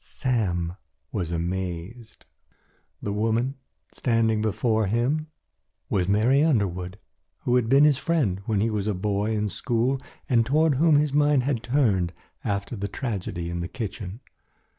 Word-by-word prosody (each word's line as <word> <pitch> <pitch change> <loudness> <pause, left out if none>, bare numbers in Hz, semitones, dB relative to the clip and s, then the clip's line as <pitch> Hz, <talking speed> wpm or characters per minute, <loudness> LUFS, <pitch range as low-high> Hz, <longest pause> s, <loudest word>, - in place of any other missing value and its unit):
Sam 90 - -1 0.3
was 90 -6 -2
amazed. 90 +6 -4 0.8
The 100 - -2
woman 115 +5 0 0.4
standing 115 -3 +1
before 110 0 +1
him 130 +9 0 0.6
was 90 -2 +1
Mary 115 +8 +4
Underwood, 95 - 0 0.4
who 125 - +1
had 120 -3 +2
been 135 +3 +6
his 145 -3 +4
friend 135 - 0
when 105 -3 +1
he 115 +1 +1
was 105 -1 -1
a 105 - 0
boy 105 +3 0
in 105 0 0
school 120 +5 0 0.3
and 120 -3 +4
toward 155 +5 +3
whom 160 -2 +5
his 145 -1 +2
mind 145 -2 +4
had 130 -4 0
turned 105 -10 +1 0.3
after 100 +3 -2
the 100 -1 -3
tragedy 95 -7 -4
in 85 - -3
the 85 - -3
kitchen. 110 -2 -6
110 Hz, 145 wpm, -25 LUFS, 95-130 Hz, 0.8 s, been